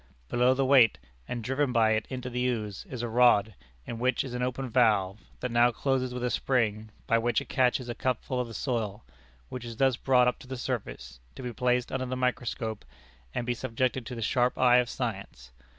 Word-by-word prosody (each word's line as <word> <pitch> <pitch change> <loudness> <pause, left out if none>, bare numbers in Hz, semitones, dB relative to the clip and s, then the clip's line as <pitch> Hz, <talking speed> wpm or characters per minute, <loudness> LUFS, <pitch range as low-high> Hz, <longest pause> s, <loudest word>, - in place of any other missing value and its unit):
Below 125 +2 +3
the 135 0 +1
weight, 130 -4 +6 0.3
and 120 -2 -4
driven 135 +3 0
by 115 -2 +3
it 110 0 0
into 125 -1 -5
the 125 +1 0
ooze, 110 -5 -3
is 125 -2 -5
a - - -1
rod, 110 -3 +4 0.3
in 115 - -6
which 130 +2 +1
is 130 -3 -7
an 125 - -3
open 130 +1 -2
valve, 110 -5 +2 0.2
that 125 - -2
now 120 +1 +5
closes 130 +1 -1
with 125 0 -5
a 125 - 0
spring, 110 -4 0 0.2
by 115 - +3
which 120 +1 +1
it 140 - -10
catches 125 -1 +1
a 120 - -3
cupful 130 +1 -2
of 125 - -1
the 115 - -9
soil, 110 -4 -2 0.5
which 125 - -6
is 115 -2 -7
thus 135 -2 +3
brought 125 -2 +3
up 125 - 0
to - - -13
the 130 0 -5
surface, 60 - -5 0.2
to - - -8
be 125 -1 -4
placed 125 0 0
under 130 -1 -2
the 130 +1 -3
microscope, 120 -3 -2 0.5
and 120 - -1
be 125 - 0
subjected 130 0 -2
to 125 - -6
the 115 - -4
sharp 125 +2 +1
eye 125 -1 +5
of 125 -1 +2
science. 100 - -5
125 Hz, 215 wpm, -28 LUFS, 115-130 Hz, 0.5 s, weight